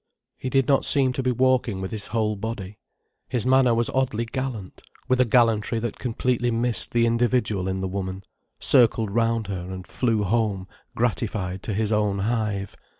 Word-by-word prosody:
He 130 - -5
did 135 0 +2
not 140 -2 +3
seem 135 -3 +3
to 135 - -2
be 130 -1 +1
walking 125 -5 +1
with 95 0 -5
his 110 -3 -4
whole 110 -1 0
body. 105 -1 -6 0.5
His 120 -4 -1
manner 130 -2 +4
was 115 0 0
oddly 130 -4 0
gallant, 120 -5 -5 0.3
with 130 -1 +3
a - - +4
gallantry 115 -1 +2
that 115 0 -4
completely 125 0 -1
missed 120 0 +1
the 120 -1 +2
individual 115 -4 +1
in 95 0 -2
the 95 - -2
woman, 95 0 -4 0.4
circled 115 -5 +4
round 115 0 +1
her 95 -2 -5
and 95 -1 -7
flew 115 -4 0
home 100 -2 0 0.3
gratified 105 -5 -2
to 105 - -4
his 110 0 0
own 105 -2 +1
hive. 105 -2 -2
115 Hz, 175 wpm, -24 LUFS, 100-125 Hz, 0.5 s, manner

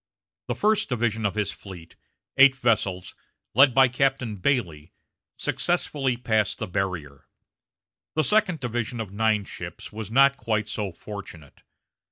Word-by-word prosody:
The - - -2
first 215 0 +1
division 115 -3 0
of 100 - -5
his 105 -2 -1
fleet, 90 -5 -12 0.4
eight 135 0 +7
vessels, 100 -7 0 0.4
led 135 +3 +6
by 130 +1 +5
Captain 130 -3 0
Bailey, 90 - -1 0.4
successfully 135 -4 0
passed 110 -4 0
the 110 - -3
barrier. 85 -8 -4 0.9
The 155 - +2
second 200 -7 +2
division 120 0 -3
of 110 -4 -5
nine 105 0 +1
ships - - -8
was 110 -2 -6
not 135 +3 +4
quite 110 -3 -1
so 105 -2 -3
fortunate. 85 -5 -10
110 Hz, 135 wpm, -25 LUFS, 100-130 Hz, 0.9 s, eight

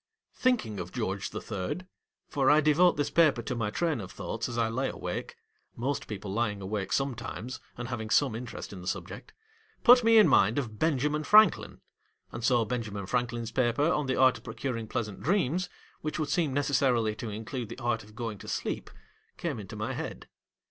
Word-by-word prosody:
Thinking 225 - 0
of 90 0 -6
George 100 -5 -2
the - - -5
Third 100 - -4 0.2
— - - -60
for 135 -2 +2
I 150 +1 +7
devote 155 +4 +4
this 145 - 0
paper 155 -8 +4
to 125 - -3
my 115 -4 -1
train 155 +1 0
of 95 - -8
thoughts 115 +2 -4
as 120 - -5
I 115 -1 +2
lay 130 +4 -1
awake: - - -5 0.4
most 135 +5 -2
people 100 -2 -5
lying 105 -2 0
awake 100 0 -3
sometimes, 130 -2 -3 0.2
and 120 0 -5
having 110 -3 -4
some 110 - +3
interest 115 -2 -6
in 95 - -8
the 90 - -9
subject— - - -5 0.5
put 245 0 +8
me 225 0 +6
in 215 - +8
mind 105 +6 +4
of 110 -7 -3
BENJAMIN 150 0 +1
FRANKLIN, 215 0 +5 0.5
and 115 - -6
so 120 -2 +3
Benjamin 110 -4 -3
Franklin's 120 +1 -2
paper 130 +5 +2
on 150 -2 0
the 130 - +1
art 130 -1 +4
of - - -23
pro 110 -2 -8
curing 115 -2 -3
pleasant 105 -2 -4
dreams, 180 -1 +1 0.3
which 155 - -3
would 155 -2 -2
seem 165 -5 +1
necessarily 130 -5 +2
to 110 +1 -6
include 110 +2 -5
the 115 - -7
art 120 -3 -1
of 105 +1 -17
going 115 -4 -4
to - - -11
sleep, - - -3 0.5
came 150 -9 -3
into 95 -3 -8
my - - -3
head. - - -6
120 Hz, 195 wpm, -29 LUFS, 110-145 Hz, 0.5 s, put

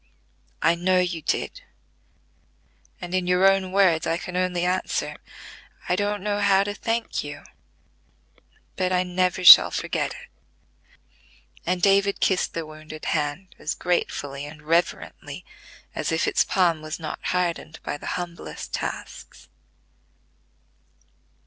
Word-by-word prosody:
"I 170 - +5
know 180 +2 +1
you 180 -2 0
did; - - -2 1.4
and 175 -1 -7
in 185 -1 0
your 180 +1 +4
own 195 -1 +2
words 185 -5 +3
I 165 - +1
can 180 +1 -7
only 180 -1 0
answer: 185 +1 -1 0.7
'I 180 - +2
don't 205 0 -1
know 205 -1 -1
how 195 -1 +4
to 205 0 -3
thank 225 +2 -2
you, 145 0 -8 1.3
but 185 0 -1
I 180 0 +2
never 180 0 0
shall - - +11
forget - - -2
it.'" - - -13 1.4
And 180 0 -1
David 200 0 +3
kissed 190 -2 +1
the 165 -1 -3
wounded 155 0 -10
hand 155 +4 -2
as 155 - -3
gratefully 145 -5 -2
and 150 0 -12
reverently 165 +3 -2 0.5
as - - -2
if - - +1
its - - +3
palm 175 -5 +1
was 155 +2 -6
not 155 -2 -5
hardened 170 -3 -2
by 145 - -4
the - - -8
humblest 175 -1 -7
tasks. 60 0 -6
180 Hz, 130 wpm, -24 LUFS, 160-190 Hz, 1.4 s, shall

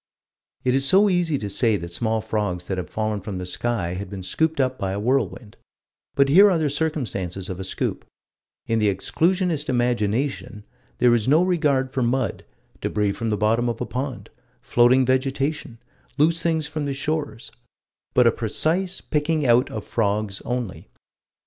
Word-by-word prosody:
It 125 -1 +2
is 135 +1 +2
so 195 +9 +5
easy 175 -5 +1
to 105 - -4
say 110 +2 +2
that 85 -1 -8
small 110 +2 -1
frogs 105 -5 -2
that 95 0 -3
have 90 - -6
fallen 110 -1 -2
from 95 0 -5
the 90 - -5
sky 95 -2 -2
had 95 +1 -5
been 95 -1 -7
scooped 160 - 0
up 130 -1 0
by 95 -1 -2
a 100 - -3
whirlwind; 115 -2 -1 0.6
but 140 0 +4
here 195 +9 +7
are 180 - +2
the 155 -3 0
circumstances 110 - -3
of 90 - -6
a - - -4
scoop; 95 - -3 0.6
in 115 0 0
the 105 -1 +3
exclusionist 165 - 0
imagination 120 -1 -1 0.3
there 125 -1 +4
is 115 -1 +1
no 155 +6 +5
regard 145 -8 +1
for 130 - -1
mud, 125 +2 -1 0.4
débris 105 -2 0
from 115 +1 -3
the 105 - 0
bottom 115 +3 +1
of 115 - -4
a 125 - -2
pond, 130 0 -5 0.3
floating 125 +2 +4
vegetation, 135 0 -1 0.4
loose 165 +3 +3
things 160 -2 0
from 150 0 -4
the 140 -1 -2
shores 145 -3 -3 0.6
but 125 - +5
a 115 - +6
precise 165 - 0
picking 150 0 0
out 120 +1 +4
of 110 - -6
frogs 105 -2 -1
only. 120 -5 -4
125 Hz, 175 wpm, -23 LUFS, 105-145 Hz, 0.6 s, here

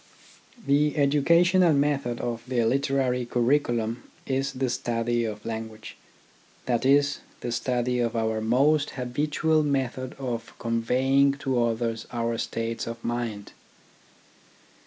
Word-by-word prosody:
The 145 +1 +2
educational 170 +5 +4
method 140 -4 0
of 115 -1 -3
the 120 -3 +1
literary 130 0 +1
curri 120 +4 +2
culum 115 -3 -2 0.3
is 135 0 -1
the 130 0 -1
study 120 -1 -1
of 105 -1 -6
language, 110 -1 -6 0.7
that 125 0 +1
is, 140 +1 +3 0.2
the 120 - -3
study 125 +1 0
of 120 -1 0
our 110 -1 0
most 145 +6 +3
habitual 150 +5 +1
method 130 -3 -1
of 120 -4 -5
conveying 130 +4 +2
to 130 -3 +2
others 115 -1 -2
our 115 -1 -2
states 115 0 -3
of 115 0 -6
mind. 115 -4 -3
125 Hz, 120 wpm, -26 LUFS, 115-140 Hz, 0.7 s, educational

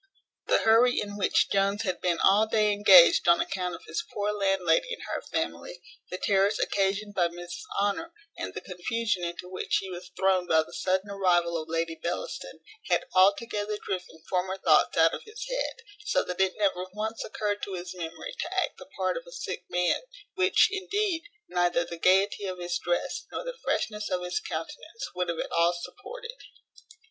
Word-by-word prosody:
The - - +4
hurry 230 +3 +5
in 205 -1 -4
which 205 - +2
Jones 200 +1 +2
had 185 -4 -2
been 175 -2 +1
all 210 +3 +5
day 215 -1 +3
engaged 195 -5 +7
on 170 0 +6
account 180 -2 -2
of - - -13
his 340 - -3
poor 205 0 -1
landlady 195 -5 +1
and - - -12
her - - -4
family, 85 - -4 0.3
the 185 - -4
terrors 195 +1 +2
occasioned 200 +1 0
by 175 -3 +2
Mrs 175 +1 -8 0.2
Honour, 205 +12 0 0.2
and - - -6
the - - -4
confusion 190 +1 -2
into 175 +1 -4
which 185 0 -1
he 190 -1 -7
was 180 0 -8
thrown 190 -2 +2
by 160 -1 +4
the - - -15
sudden 190 +2 -1
arrival 175 -3 +2
of 160 -1 -4
Lady 165 0 -1
Bellaston, 170 - -5 0.3
had - - +2
altogether 205 +2 +2
driven 180 -5 -6
former 185 +1 -1
thoughts 160 -5 +3
out 165 0 +5
of - - -4
his 445 +3 -7
head; - - -3 0.2
so - - +1
that 180 +1 -3
it 190 -1 +1
never 190 -3 0
once 220 +1 -3
occurred 205 -1 -2
to 195 - -4
his 180 0 -6
memory 175 - -6
to - - -3
act - - -1
the - - -11
part - - 0
of - - -8
a - - -12
sick - - -5
man; 180 - +1 0.3
which, 375 0 +4
indeed, 390 -2 -1 0.2
neither 175 -1 +1
the 170 -1 -8
gaiety 195 +3 +3
of 185 -1 -4
his 175 -1 -2
dress, 175 0 -2
nor - - -4
the - - -5
freshness 210 -1 -1
of 180 -1 -1
his 180 - -1
countenance, 460 +1 -6
would 180 -1 -2
have 170 - -2
at - - -4
all 170 +1 +3
supported. 470 - -9
190 Hz, 190 wpm, -28 LUFS, 175-215 Hz, 0.3 s, engaged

